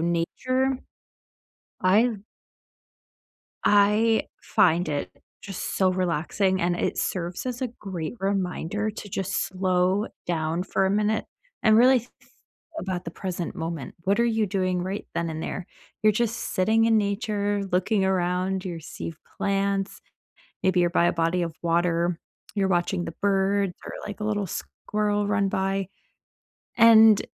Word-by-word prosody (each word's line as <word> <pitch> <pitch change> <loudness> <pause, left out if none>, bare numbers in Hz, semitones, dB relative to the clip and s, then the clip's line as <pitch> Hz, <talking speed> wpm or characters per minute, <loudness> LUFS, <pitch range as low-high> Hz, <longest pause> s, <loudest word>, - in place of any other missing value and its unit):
nature, 255 +11 0 1.0
I've 210 +4 +3 1.5
I 210 +2 +4 0.2
find 170 +1 +3
it 145 -2 -2 0.3
just 195 -2 -5
so 190 -1 +4
relaxing, 185 +2 0
and 175 0 +1
it - - -1
serves 180 +4 -2
as 250 0 -3
a 255 - 0
great 180 -4 -5
reminder 195 +1 -1
to 210 0 -9
just 195 0 -3
slow 185 +2 +1 0.2
down 165 0 -1
for 195 0 0
a - - +1
minute 210 +2 +1 0.4
and 215 -1 +5
really 250 +2 +6
th 240 - -18
th - - -25 0.5
about 185 - -3
the 165 - -5
present 180 -1 -4
moment. 160 -5 -5
What 200 +3 +2
are - - +4
you 225 -2 +1
doing 185 -2 0
right 190 +3 -4
then 170 - -1
and 160 0 -5
there? 180 - -4 0.4
You're 215 0 +5
just 230 +1 0 0.2
sitting 220 +4 +3
in 225 -1 +4
nature, 205 0 -1
looking 190 +2 +2
around, 185 0 0
you're 175 -3 -5
see 160 +1 -6 0.2
plants, 195 0 -1 0.6
maybe 185 -1 +3
you're 175 - +3
by 170 - +3
a - - +2
body 165 +1 +1
of 170 -2 -2
water. 170 0 +1 0.3
You're 200 -2 +1
watching 175 0 0
the 165 - -6
birds, 195 -1 +2
or, - - -6
like, 205 - -7
a 210 - -3
little 205 -2 0
squirrel 210 +3 -2
run 200 -1 +1
by. 195 0 -1 0.9
And 225 -2 +7
195 Hz, 145 wpm, -25 LUFS, 175-210 Hz, 1.5 s, And